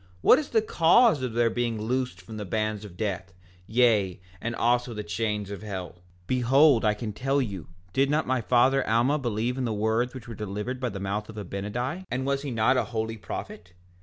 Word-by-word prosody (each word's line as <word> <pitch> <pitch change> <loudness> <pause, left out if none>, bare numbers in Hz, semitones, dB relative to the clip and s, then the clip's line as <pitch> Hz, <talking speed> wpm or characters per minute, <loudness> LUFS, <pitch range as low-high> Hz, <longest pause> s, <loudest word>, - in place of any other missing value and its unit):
What 255 - +7
is 300 - -5
the 220 -2 +2
cause 175 - +4
of 125 -3 -3
their 115 0 +2
being 120 -1 -1
loosed 120 -3 -2
from 110 +4 -9
the 105 - -4
bands 110 +1 -2
of 95 -4 -11
death, 95 -4 -3 0.3
yea, 110 -6 +3 0.2
and 115 0 -3
also 120 0 +1
the 105 - -4
chains 105 -1 -2
of 100 - -6
hell? 95 -5 -5
5:11 - - -24 0.3
Behold, 130 +2 +4
I 105 -1 +3
can 105 0 -5
tell 135 +5 0
you—did 95 - -2
not 150 +2 +1
my 130 -1 0
father 130 +4 +3
Alma 120 +7 +3
believe 120 +1 -1
in 130 - 0
the 115 - -1
words 110 +4 0
which 120 -3 -9
were 115 - -6
delivered 105 +4 -4
by 125 -1 -1
the 100 -2 -6
mouth 100 +2 -3
of 110 - -9
Abinadi? 105 - -4
And 130 +2 -2
was 140 0 0
he 145 - -4
not 120 +2 +2
a 115 - +1
holy 110 0 -3
prophet? 90 -3 -7
115 Hz, 210 wpm, -27 LUFS, 105-130 Hz, 0.3 s, What